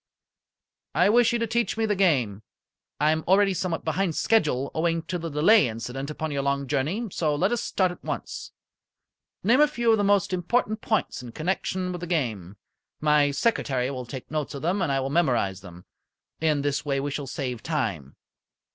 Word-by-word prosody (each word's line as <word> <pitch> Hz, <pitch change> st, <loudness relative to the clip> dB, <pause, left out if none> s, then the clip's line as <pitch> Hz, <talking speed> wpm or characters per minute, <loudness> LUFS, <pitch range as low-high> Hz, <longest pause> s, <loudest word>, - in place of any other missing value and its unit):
"I 180 Hz, +3 st, +4 dB
wish 240 Hz, +2 st, +5 dB
you 240 Hz, -, +1 dB
to 230 Hz, -, 0 dB
teach 235 Hz, 0 st, -1 dB
me 225 Hz, -, +1 dB
the 210 Hz, -1 st, +1 dB
game. 130 Hz, -, +1 dB, 0.6 s
I 150 Hz, +1 st, +4 dB
am 160 Hz, 0 st, -1 dB
already 195 Hz, +1 st, +4 dB
somewhat 175 Hz, -2 st, -3 dB
behind 165 Hz, +1 st, 0 dB
schedule 150 Hz, -, +1 dB
owing 165 Hz, 0 st, 0 dB
to 180 Hz, +2 st, -4 dB
the 165 Hz, 0 st, -4 dB
delay 160 Hz, -, +5 dB
incident 125 Hz, +5 st, -5 dB
upon 155 Hz, 0 st, -4 dB
your 140 Hz, -1 st, -1 dB
long 140 Hz, 0 st, 0 dB
journey, 150 Hz, -, -1 dB
so 155 Hz, -4 st, 0 dB
let 185 Hz, +7 st, +1 dB
us 240 Hz, -, 0 dB
start 185 Hz, -2 st, +1 dB
at 180 Hz, -, -12 dB
once. -, -, -5 dB, 0.9 s
Name 240 Hz, +8 st, +4 dB
a 300 Hz, -, +7 dB
few 240 Hz, -5 st, +1 dB
of 220 Hz, -, +3 dB
the -, -, +2 dB
most 200 Hz, -1 st, +2 dB
important 215 Hz, +4 st, 0 dB
points 220 Hz, -, -1 dB
in 120 Hz, -2 st, -10 dB
connection 185 Hz, +2 st, -2 dB
with 175 Hz, -1 st, -6 dB
the 175 Hz, -, -5 dB
game. 110 Hz, -, -2 dB, 0.4 s
My 150 Hz, -1 st, +3 dB
secretary 140 Hz, -, 0 dB
will 125 Hz, -3 st, -6 dB
make 130 Hz, 0 st, -8 dB
notes 155 Hz, -2 st, -3 dB
of 140 Hz, -, -7 dB
them, 185 Hz, +4 st, 0 dB
and 165 Hz, -6 st, 0 dB
I 135 Hz, -, +1 dB
will 135 Hz, +1 st, -3 dB
memorize 120 Hz, -, +1 dB
them. 90 Hz, -2 st, -12 dB, 0.5 s
In 155 Hz, -3 st, +1 dB
this 145 Hz, 0 st, -1 dB
way 140 Hz, -2 st, -1 dB
we 145 Hz, +1 st, -2 dB
shall 140 Hz, 0 st, -4 dB
save 125 Hz, -4 st, -4 dB
time. 100 Hz, -, -3 dB
155 Hz, 195 wpm, -26 LUFS, 135-190 Hz, 0.9 s, a